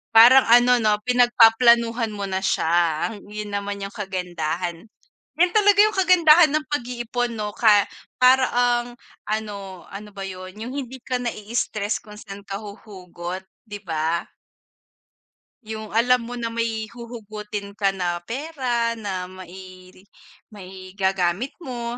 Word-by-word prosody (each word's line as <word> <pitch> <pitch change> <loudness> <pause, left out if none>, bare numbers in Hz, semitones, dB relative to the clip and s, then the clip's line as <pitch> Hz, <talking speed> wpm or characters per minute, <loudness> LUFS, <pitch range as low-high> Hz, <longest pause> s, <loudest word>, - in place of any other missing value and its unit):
Parang 250 +4 +8
ano, 245 +1 +6
'no? 215 -2 +3
Pinagpaplanuhan 235 -1 +4
mo 200 -1 -5
na 190 0 -2
siya. 170 -3 +1 0.2
Yun 210 0 -7
naman 200 0 -4
yung 195 - -6
kagandahan. 180 -2 -4 0.5
Yun 355 +1 +3
talaga 410 -1 +4
yung 430 0 +2
kagandahan 345 -4 +6
ng 305 -1 0
pag-iipon, 245 -2 -2
'no? 210 -1 -4
Ka 210 -3 +5 0.3
para 255 +1 +5
ang 240 0 +1 0.4
ano, 200 -4 -5
ano 210 +2 -8
ba 195 - -6
yun, 185 -1 -8
yung 240 +4 -6
hindi 265 -2 -6
ka 250 -1 -2
nai-stress 220 -1 -3
kung 210 -1 -13
saan 200 -1 -10
ka 195 0 -6
huhugot, 190 -3 -9 0.2
'di 205 -1 -7
ba? 160 +1 -1 1.4
Yung 220 -1 -7
alam 245 +3 +3
mo 245 +1 -7
na 230 -1 -4
may 225 -1 -2
huhugutin 215 -3 -8
ka 200 -1 +1
na 175 -3 -3
pera 245 - -2
na 195 -5 -5
mai 185 0 -12 0.6
maigagamit 190 +2 -3
mo, 240 -2 -5
215 Hz, 130 wpm, -23 LUFS, 190-245 Hz, 1.4 s, Parang